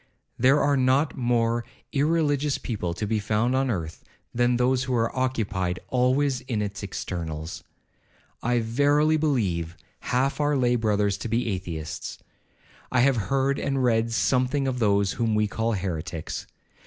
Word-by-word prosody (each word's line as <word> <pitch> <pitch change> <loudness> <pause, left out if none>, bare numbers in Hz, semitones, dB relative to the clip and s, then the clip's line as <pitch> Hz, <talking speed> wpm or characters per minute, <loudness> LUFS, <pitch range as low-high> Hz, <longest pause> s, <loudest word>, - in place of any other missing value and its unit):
There 135 +4 +5
are 140 -1 +2
not 130 +3 +2
more 120 -2 +1 0.3
irreligious 145 -1 +1
people 90 -7 -3
to 105 - -3
be 110 +1 0
found 110 +4 +1
on 135 0 +1
earth 85 -7 -4 0.3
than 120 0 +2
those 125 +1 +2
who 130 -1 -1
are 115 +1 0
occupied 105 -9 -1
always 130 +1 +2
in 125 -4 -3
its 100 -1 -5
externals. 85 -5 -5 0.8
I 120 0 +1
verily 145 +7 +3
believe 95 - 0 0.2
half 130 +4 0
our 145 -1 +2
lay 125 -1 +2
brothers 105 -3 +1
to 110 - -4
be 115 +2 0
Atheists. 85 -5 -5 0.7
I 125 - +3
have 135 +1 +4
heard 135 0 +1
and 135 -2 0
read 115 -1 +2
something 130 +4 +1
of 125 -1 -2
those 100 -3 +2
whom 115 -3 0
we 105 0 +3
call 110 +2 -1
heretics. 90 -4 -4
120 Hz, 150 wpm, -25 LUFS, 100-130 Hz, 0.8 s, There